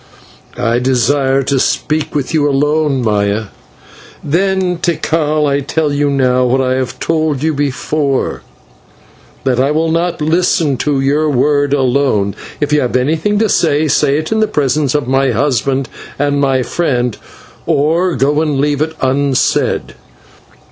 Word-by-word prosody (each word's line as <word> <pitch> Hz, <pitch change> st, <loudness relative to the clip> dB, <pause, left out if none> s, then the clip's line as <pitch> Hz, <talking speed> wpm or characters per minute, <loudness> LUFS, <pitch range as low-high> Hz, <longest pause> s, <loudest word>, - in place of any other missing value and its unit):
"I 120 Hz, -1 st, 0 dB
desire 135 Hz, +2 st, +1 dB
to 135 Hz, 0 st, 0 dB
speak 155 Hz, +4 st, -1 dB
with 145 Hz, 0 st, -2 dB
you 145 Hz, -2 st, +2 dB
alone, 145 Hz, -1 st, +1 dB
Maya." 105 Hz, -1 st, 0 dB, 0.7 s
"Then, 185 Hz, +3 st, 0 dB
Tikal, 155 Hz, -3 st, 0 dB
I 140 Hz, -1 st, +1 dB
tell 145 Hz, +1 st, -1 dB
you 145 Hz, 0 st, +1 dB
now 130 Hz, -2 st, +2 dB
what 125 Hz, +1 st, +1 dB
I 130 Hz, -1 st, +1 dB
have 130 Hz, -1 st, -3 dB
told 155 Hz, -4 st, -1 dB
you 160 Hz, 0 st, +1 dB
before, 140 Hz, 0 st, -1 dB, 1.0 s
that 125 Hz, -2 st, 0 dB
I 135 Hz, +2 st, +2 dB
will 160 Hz, +2 st, 0 dB
not 170 Hz, +1 st, -1 dB
listen 160 Hz, -2 st, +1 dB
to 145 Hz, +1 st, 0 dB
your 145 Hz, +3 st, +1 dB
words 145 Hz, +1 st, +1 dB
alone. 130 Hz, -7 st, +1 dB, 0.3 s
If 145 Hz, 0 st, -1 dB
you 150 Hz, -, +3 dB
have 125 Hz, -, -2 dB
anything 160 Hz, +10 st, 0 dB
to 220 Hz, +1 st, +2 dB
say, 155 Hz, -5 st, +1 dB
say 140 Hz, 0 st, +2 dB
it 155 Hz, +4 st, -4 dB
in 220 Hz, -, +1 dB
the 215 Hz, -, +2 dB
presence 145 Hz, -2 st, 0 dB
of 145 Hz, -4 st, -1 dB
my 135 Hz, +1 st, +2 dB
husband 135 Hz, +1 st, 0 dB, 0.3 s
and 145 Hz, 0 st, 0 dB
my 135 Hz, -2 st, +1 dB
friend, 125 Hz, -3 st, -1 dB, 0.5 s
or 165 Hz, +5 st, +1 dB
go 145 Hz, +3 st, +1 dB
and 150 Hz, -4 st, -1 dB
leave 145 Hz, 0 st, 0 dB
it 160 Hz, +1 st, -2 dB
unsaid." 135 Hz, 0 st, 0 dB
145 Hz, 150 wpm, -14 LUFS, 130-155 Hz, 1.0 s, you